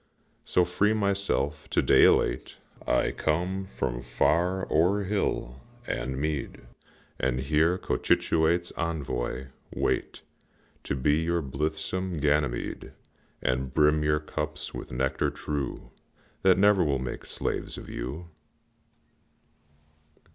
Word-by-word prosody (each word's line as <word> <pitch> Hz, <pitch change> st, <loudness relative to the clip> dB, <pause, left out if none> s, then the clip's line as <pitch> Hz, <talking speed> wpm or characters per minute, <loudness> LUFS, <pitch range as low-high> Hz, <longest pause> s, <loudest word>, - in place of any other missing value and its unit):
So, 90 Hz, -, +2 dB
free 100 Hz, +5 st, +2 dB
myself, 100 Hz, -1 st, 0 dB
to -, -, +1 dB
day, -, -, +6 dB
elate -, -, +2 dB, 0.3 s
I -, -, +2 dB
come 90 Hz, +5 st, -1 dB
from 60 Hz, -10 st, -3 dB
far 85 Hz, +10 st, +1 dB
o'er 90 Hz, +6 st, +3 dB
hill 90 Hz, -10 st, -2 dB, 0.2 s
and 65 Hz, 0 st, -3 dB
mead, 75 Hz, -2 st, -3 dB, 0.6 s
And 65 Hz, -1 st, 0 dB
here, 80 Hz, +6 st, +2 dB
Cochituate's 85 Hz, -1 st, +1 dB
envoy, 65 Hz, -5 st, -3 dB, 0.2 s
wait -, -, -1 dB, 0.6 s
To -, -, -1 dB
be 75 Hz, +3 st, +2 dB
your 85 Hz, 0 st, 0 dB
blithesome 80 Hz, +6 st, -2 dB
Ganymede, 75 Hz, -3 st, 0 dB, 0.5 s
And 65 Hz, +1 st, -1 dB
brim 75 Hz, 0 st, +4 dB
your 75 Hz, 0 st, +2 dB
cups 75 Hz, 0 st, -5 dB
with -, -, -7 dB
nectar 65 Hz, +2 st, 0 dB
true 70 Hz, -3 st, -4 dB, 0.5 s
That 95 Hz, -1 st, +5 dB
never 100 Hz, -1 st, +5 dB
will 70 Hz, -4 st, +1 dB
make 65 Hz, 0 st, -5 dB
slaves -, -, -3 dB
of -, -, -9 dB
you. 65 Hz, +8 st, -5 dB
75 Hz, 110 wpm, -28 LUFS, 65-90 Hz, 0.6 s, day